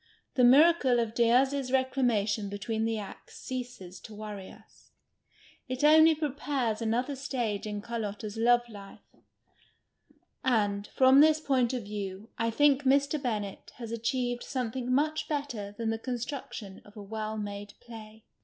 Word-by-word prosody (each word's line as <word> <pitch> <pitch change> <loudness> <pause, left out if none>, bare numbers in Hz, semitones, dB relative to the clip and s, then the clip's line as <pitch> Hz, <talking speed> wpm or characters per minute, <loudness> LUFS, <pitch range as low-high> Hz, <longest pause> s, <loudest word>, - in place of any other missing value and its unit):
The 250 - +2
miracle 270 -1 +6
of 230 -2 -1
Diaz's 255 +3 +2
reclamation 240 -6 +1
between 220 +2 -2
the 225 0 -1
acts 205 -2 -9
ceases 245 -8 -7
to 215 - -11
worry 205 -2 -7
us; - - -19 0.8
it 255 +2 -4
only 315 +1 +7
prepares 280 -6 -2
another 245 +5 -1
stage 240 -6 -3
in 210 -1 -4
Carlotta's 215 -2 -5
love 240 +1 +3
life. 200 -3 -13 1.3
And, 205 -5 +1
from 260 +1 +5
this 310 +1 +6
point 260 -5 +1
of 250 -3 -3
view, 200 0 -6
I 230 0 +1
think 280 +3 +3
Mr. 280 +2 +2
Bennett 210 -6 -4
has 230 -2 -8
achieved 245 +1 -1
something 250 0 -3
much 305 +4 +1
better 245 -9 -4
than 225 -1 -1
the 225 - -3
construction 240 -4 -6
of 205 +1 -17
a 205 - -7
well 215 +1 -4
made 205 -1 -6
play. 220 -2 -12
235 Hz, 145 wpm, -29 LUFS, 215-260 Hz, 1.3 s, only